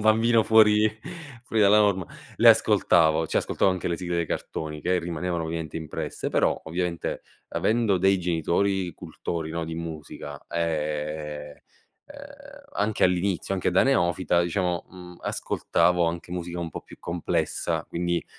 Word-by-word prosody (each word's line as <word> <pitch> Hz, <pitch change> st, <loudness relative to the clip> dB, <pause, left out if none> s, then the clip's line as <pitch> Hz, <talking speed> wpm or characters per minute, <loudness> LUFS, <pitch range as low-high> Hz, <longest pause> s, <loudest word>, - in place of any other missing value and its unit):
bambino 115 Hz, +2 st, +4 dB
fuori 110 Hz, -1 st, +5 dB, 0.5 s
fuori 110 Hz, -2 st, +1 dB
dalla 105 Hz, +1 st, +6 dB
norma, 95 Hz, -5 st, +2 dB, 0.3 s
le -, -, +6 dB
ascoltavo, 80 Hz, -2 st, +4 dB
ci -, -, -2 dB
ascoltavo 95 Hz, -, +2 dB
anche 90 Hz, -1 st, -2 dB
le 85 Hz, -, -1 dB
sigle 90 Hz, -1 st, -3 dB
dei 85 Hz, -, 0 dB
cartoni 75 Hz, 0 st, -4 dB
che 90 Hz, +2 st, +1 dB
rimanevano 85 Hz, 0 st, -3 dB
ovviamente 80 Hz, -1 st, -4 dB
impresse, 80 Hz, -2 st, -4 dB
però -, -, +1 dB
ovviamente 85 Hz, +1 st, -3 dB, 0.3 s
avendo 110 Hz, -4 st, +1 dB
dei 95 Hz, +1 st, +3 dB
genitori 90 Hz, +2 st, 0 dB
cultori, 80 Hz, -2 st, -5 dB
no, 85 Hz, +1 st, -3 dB
di 80 Hz, 0 st, -5 dB
musica, 80 Hz, -3 st, -7 dB
ehm, 75 Hz, -2 st, -3 dB, 0.5 s
ehm, -, -, -13 dB
anche 105 Hz, +1 st, +1 dB
all'inizio, 90 Hz, +1 st, 0 dB
anche 90 Hz, -1 st, 0 dB
da 90 Hz, -, +4 dB
neofita, 85 Hz, -, +2 dB
diciamo, 90 Hz, 0 st, -1 dB
mhmm, 90 Hz, -1 st, -11 dB
ascoltavo 90 Hz, -1 st, +1 dB
anche 85 Hz, +1 st, -4 dB
musica 85 Hz, -1 st, -4 dB
un 85 Hz, -1 st, -4 dB
po' -, -, -6 dB
più -, -, -14 dB
complessa, 85 Hz, 0 st, -2 dB
quindi 85 Hz, 0 st, -1 dB
85 Hz, 145 wpm, -26 LUFS, 80-95 Hz, 0.5 s, dalla